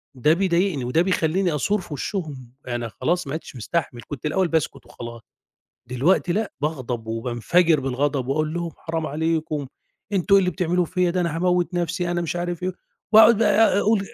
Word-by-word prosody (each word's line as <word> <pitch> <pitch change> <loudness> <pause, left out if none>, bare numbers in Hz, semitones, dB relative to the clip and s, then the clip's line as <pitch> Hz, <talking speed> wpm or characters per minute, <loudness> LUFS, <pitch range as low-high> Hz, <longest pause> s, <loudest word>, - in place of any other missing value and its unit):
ده 150 +5 +3
بيضايقني 175 -5 +1
وده 140 +7 +2
بيخلّيني 180 -1 +1
أثور 205 +8 0
في 160 - -9
وِشّهم. 140 - -5
أنا 120 -2 -3
خلاص 175 +7 -1
ما 135 - -4
عُدتش 160 - -6
مستحمل، 125 0 -3
كنت 145 -1 -7
الأول 185 +4 +1
باسكت 160 -4 -1
وخلاص، 115 -1 -9 0.7
دلوقتي 150 +8 +1
لأ، 215 +2 -1
باغضب 130 -7 -3
وبانفجر 125 +9 +1
بالغضب 135 0 -1
وأقول 155 +3 0
لهم: 170 -1 -3
"حرام 160 -1 -3
عليكم، 155 -1 -1 0.5
أنتم 195 +1 +3
إيه - - +8
اللي 180 -1 +1
بتعملوه 180 0 0
فيّا 180 +1 +1
ده 180 +1 0
أنا 170 -2 -1
هاموّت 180 +1 +1
نَفْسي،" 175 +1 -1
أنا 175 - 0
مش 170 +1 -3
عارف 175 0 -3
إيه، 185 +1 -1 0.4
وأقعُد 220 0 +8
بقى 210 -2 +4
أقول 215 0 +3
165 Hz, 175 wpm, -23 LUFS, 140-180 Hz, 0.7 s, إيه